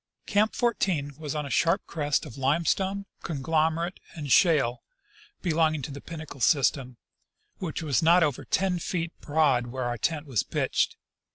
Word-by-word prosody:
Camp 215 +2 +2
14 180 -11 0
was 150 -2 -4
on 150 -1 -2
a 140 - -6
sharp 170 +4 +2
crest 150 -3 -1
of 115 - -10
limestone, 170 +8 0 0.2
conglomerate, 160 +3 0 0.2
and 145 -4 -5
shale 140 -9 +4 0.6
belonging 160 -4 +1
to 150 - -5
the 140 0 -8
Pinnacle 155 -4 -9
system, 130 +1 +2 0.6
which 165 -3 -4
was 145 -6 +1
not 170 +2 +5
over 145 -5 -1
ten 185 -2 0
feet 170 -1 -3
broad 145 -5 +2
where 130 +1 -4
our 120 -1 -2
tent 155 +4 -1
was 130 -8 0
pitched. - - 0
155 Hz, 155 wpm, -27 LUFS, 140-170 Hz, 0.6 s, not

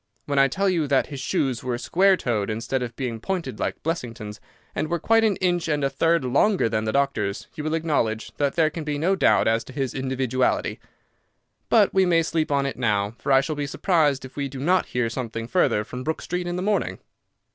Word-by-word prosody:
When 140 -1 +1
I 135 - +6
tell 195 +9 -1
you 170 -5 +1
that 135 -1 +2
his 140 - -5
shoes 135 -4 -1
were 125 -1 -2
square 190 +8 +3
toed 110 - -1
instead 115 +4 -2
of 120 -2 -5
being 120 -4 -4
pointed 185 - -3
like - - -3
Blessington's, 115 -10 -4 0.3
and 155 - -2
were 170 - 0
quite 225 +7 +3
an 215 -3 +3
inch 175 -2 0
and 150 -2 0
a 135 - +1
third 165 +1 +2
longer 145 - +3
than 110 -1 -1
the 110 - 0
doctor's, 140 -7 0
you 150 - -6
will 155 +1 0
acknowledge 130 -9 -1
that 140 -1 0
there 160 -2 +3
can 160 0 -5
be 150 -1 -2
no 180 +6 +2
doubt - - +3
as 115 +1 +2
to 130 - -11
his 135 -2 -2
individuality. 130 -1 -1 0.9
But - - +4
we 190 -1 +4
may 165 -1 +3
sleep 160 -2 -1
on 140 -1 +2
it 140 - -3
now, 105 -4 +1
for - - -2
I 135 0 +6
shall 150 +3 -3
be 145 -1 -3
surprised 145 -4 +1
if 130 - -12
we 140 -1 -2
do 135 0 -8
not 180 +6 +2
hear 125 -2 -1
something 115 -1 -4
further 125 - +2
from 125 +4 -7
Brook 160 +2 -3
Street 180 0 -3
in 175 - -2
the 180 - -2
morning." 210 +1 0
140 Hz, 225 wpm, -24 LUFS, 125-170 Hz, 0.9 s, I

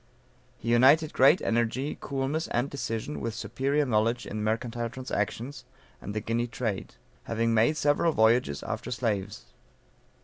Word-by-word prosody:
He 115 - -5
united 140 +7 +5
great 140 +7 +5
energy, 120 +5 0
coolness 140 +4 -2
and 120 +4 -1
decision, 125 +1 -4
with 115 -2 -3
superior 140 +2 0
knowledge 115 0 +1
in 105 +1 -4
mercantile 115 +2 -2
transactions, 125 +1 -4 0.4
and 100 - -6
the - - +1
Guinea 115 +3 -1
trade; 110 - -4 0.3
having 115 0 0
made 115 +8 +3
several 150 +3 +2
voyages 110 - +2
after - - -4
slaves. 105 -5 -2
120 Hz, 135 wpm, -28 LUFS, 110-135 Hz, 0.4 s, united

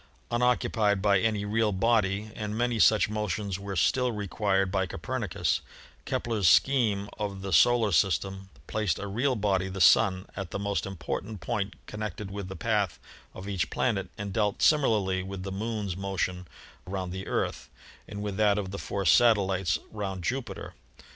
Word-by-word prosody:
unoccupied 120 -4 +2
by 100 -1 +3
any 105 -1 0
real 110 +1 +1
body, 105 0 +1
and 105 0 -4
many 120 -1 0
such 105 0 +5
motions 105 -2 -2
were 100 0 -5
still 125 +8 +2
required 100 -2 0
by 95 -1 0
Copernicus, - - -2 0.4
Kepler's 110 -7 +1
scheme 110 -7 +3
of 100 -2 -4
the 95 -2 -3
solar 115 - +5
system 95 +2 +1 0.2
placed 105 -7 -1
a - - -5
real 125 +7 0
body, 95 -3 0
the 95 +1 -6
Sun, 95 +2 +5
at 95 -3 -5
the - - -4
most 100 0 -2
important 95 +3 -5
point 100 +4 -3
connected 105 -2 -6
with 100 -1 -5
the 95 - -7
path 105 -5 0 0.4
of 95 - -8
each 95 -5 -1
planet 100 -7 -1
and 100 -1 -5
dealt 105 -1 0
similarly 105 -11 +3
with 95 0 -6
the 95 - -5
Moon's 105 -2 -3
motion 95 -2 -3 0.4
round 95 -1 -4
the 95 +1 -6
Earth - - -2 0.4
and 100 0 -6
with 100 -2 -4
that 105 -1 +3
of 95 -2 -3
the 100 - -5
four 100 -1 -3
satellites 95 -3 +4
round 95 -4 -4
Jupi 130 +7 -2
ter. - - -9
100 Hz, 165 wpm, -28 LUFS, 95-110 Hz, 0.4 s, such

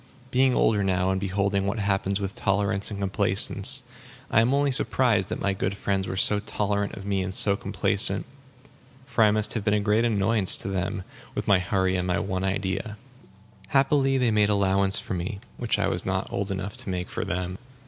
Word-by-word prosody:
Being 130 0 +3
older 105 -2 +2
now, 95 -1 0
and 95 0 -2
beholding 100 0 -1
what 100 +4 -2
happens 100 -1 -1
with 100 -1 -4
tolerance 100 0 0
and 100 -2 -6
complacence, 100 +5 +3 0.5
I 110 - +4
am 115 +3 +1
only 140 0 +2
surprised 125 - +1
that - - -4
my 100 - -1
good 95 +1 -3
friends 95 -1 -2
were 95 - -4
so 105 +2 +3
tolerant 100 0 -2
of 100 - -9
me 100 -1 -1
and 95 0 -3
so 100 +1 +4
complacent. - - 0 0.8
For 125 -4 +1
I 105 - +5
must 105 0 +1
have 115 - -3
been 105 0 +1
a - - +1
great 105 +2 +1
annoyance 105 -3 +4
to 100 - -3
them, 95 0 -3 0.3
with - - -4
my 100 -2 +4
hurry 95 0 0
and 90 0 -2
my 90 - 0
one 95 -1 -3
idea. 95 +2 -3 0.7
Happily 135 0 +2
they 125 -3 +1
made 105 -1 +2
allowance 100 -1 +2
for - - -4
me, 90 +2 -4 0.2
which - - -1
I - - 0
was - - -2
not - - -3
old 100 0 -2
enough 95 +1 -4
to - - -3
make 90 -1 -4
for - - -3
them. 90 +1 -4
100 Hz, 200 wpm, -25 LUFS, 95-105 Hz, 0.8 s, I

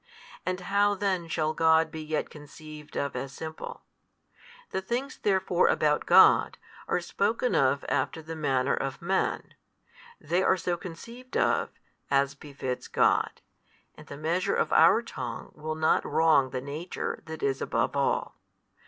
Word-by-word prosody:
and 185 0 -1
how 205 +2 +2
then 190 -4 -1
shall 155 -1 -1
God 160 0 +3
be 160 - -6
yet 155 0 -3
conceived 150 0 -12
of 140 -1 -2
as 135 - -4
Simple? 160 0 -7 0.9
The 190 - -2
things 245 +8 -4
therefore 190 -3 +2
about 150 -1 +1
God, - - +6 0.3
are - - +1
spoken - - -1
of - - +2
after 160 - -1
the 165 +1 -7
manner 135 -4 +1
of 135 -1 -3
men: 190 +3 -1 0.7
they 180 +2 0
are 190 - +3
so 175 0 -1
conceived 230 +9 -8
of, - - +2 0.4
as 140 0 +2
befits 140 -3 -6
God, - - +1 0.5
and - - -15
the 140 - -8
measure 175 +6 0
of - - 0
our 230 - +6
tongue 125 - -6
will 155 +1 -5
not 155 0 +2
wrong 155 -5 +3
the 130 0 -4
Nature 150 +6 -5
That 160 0 -7
is 135 -1 0
above - - -1
all. - - 0
160 Hz, 150 wpm, -28 LUFS, 145-185 Hz, 0.9 s, God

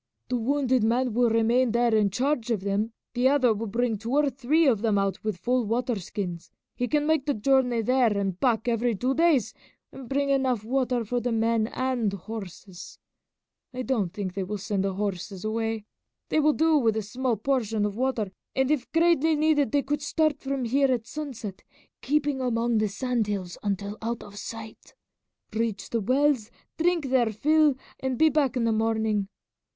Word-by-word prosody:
The 250 - 0
wounded 260 0 +1
man 240 +2 +1
will 240 +1 +3
remain 230 +2 +2
there 235 -1 +2
in 210 -2 +3
charge 250 +3 -1
of 220 -5 0
them, 200 +3 -1 0.2
the 250 +2 +3
other 260 -5 +3
will 220 +2 -4
bring 230 0 -1
two 230 +4 -4
or 290 -1 +3
three 275 +6 +2
of 235 -7 +3
them 220 -3 +2
out 195 -1 -1
with 215 -4 -2
full 245 +7 0
water 230 +1 -1
skins; 175 -2 -5 0.3
he 245 - -1
can 295 +1 +1
make 310 -2 +1
the 285 - +1
journey 250 0 +2
there 245 -3 +2
and 195 -2 -2
back 235 -3 +1
every 235 0 +1
two 255 +7 0
days 315 -6 +2 0.4
and - - -11
can 260 - -9
bring 280 +2 0
enough 260 -5 +1
water 250 0 0
for 245 +3 -1
the 245 0 -2
men 225 0 +1
and 250 -5 -1
horses. 195 -2 -8 0.8
I 255 - -3
don't 225 -9 0
think 190 -2 -4
they 195 0 -2
will 210 +3 -4
send 195 0 -2
the 195 - -1
horses 195 -1 -4
away. 225 -1 -2 0.4
They - - +2
will 305 0 +4
do 320 0 +3
with 225 -4 +1
a 220 - -1
small 245 +3 -1
portion 225 -3 0
of 205 -1 -3
water, 240 -5 -1 0.2
and 265 +1 +2
if 280 -5 -1
greatly 330 -1 +3
needed 295 -5 +2
they 285 -1 +2
could 295 +2 -2
start 310 0 +1
from 270 -2 -3
here 270 +3 +2
at 240 -3 -1
sunset, 240 -9 -6 0.4
keeping 290 -2 0
among 235 -2 +1
the 215 - +2
sand 240 +1 -1
hills 190 -4 -3
until 200 +1 -3
out 230 +1 -3
of 205 - -12
sight, 220 +1 -9 0.6
reach 220 -2 -2
the 230 - 0
wells, 255 0 +2 0.3
drink 330 -5 +1
their 240 -4 +3
fill, 300 +5 +3 0.2
and 260 -1 -2
be 315 +4 +5
back 285 -4 +1
in 240 - +1
the 230 - +2
morning. 220 -2 0
235 Hz, 190 wpm, -26 LUFS, 215-270 Hz, 0.8 s, be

